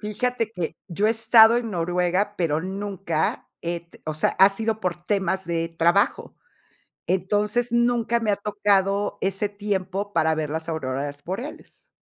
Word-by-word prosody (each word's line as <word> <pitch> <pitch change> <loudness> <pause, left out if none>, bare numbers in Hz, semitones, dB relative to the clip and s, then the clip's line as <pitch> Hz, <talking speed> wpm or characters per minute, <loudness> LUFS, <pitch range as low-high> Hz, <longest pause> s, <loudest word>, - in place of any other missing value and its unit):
Fíjate 230 +2 -2
que 165 -4 -4
yo 200 +4 0
he - - +4
estado 225 0 +6
en 235 -2 -2
Noruega, 180 +3 0
pero 160 -3 0
nunca 190 -3 -3
he 170 0 -2
t 170 0 -21
o 155 - -2
sea, 155 - +1
ha 195 - +8
sido 220 +2 -1
por 180 -3 -1
temas 190 -1 0
de 165 -1 -2
trabajo. 170 +4 +1 0.7
Entonces, 210 +6 0
nunca 235 -1 +2
me 220 -2 0
ha - - +2
tocado 200 -1 +1
ese 195 +2 0
tiempo 200 -1 -3
para 160 -4 +2
ver 155 -2 -2
las 160 +2 -4
auroras 145 -2 -4
boreales. 245 - -7
195 Hz, 155 wpm, -24 LUFS, 170-210 Hz, 0.7 s, ha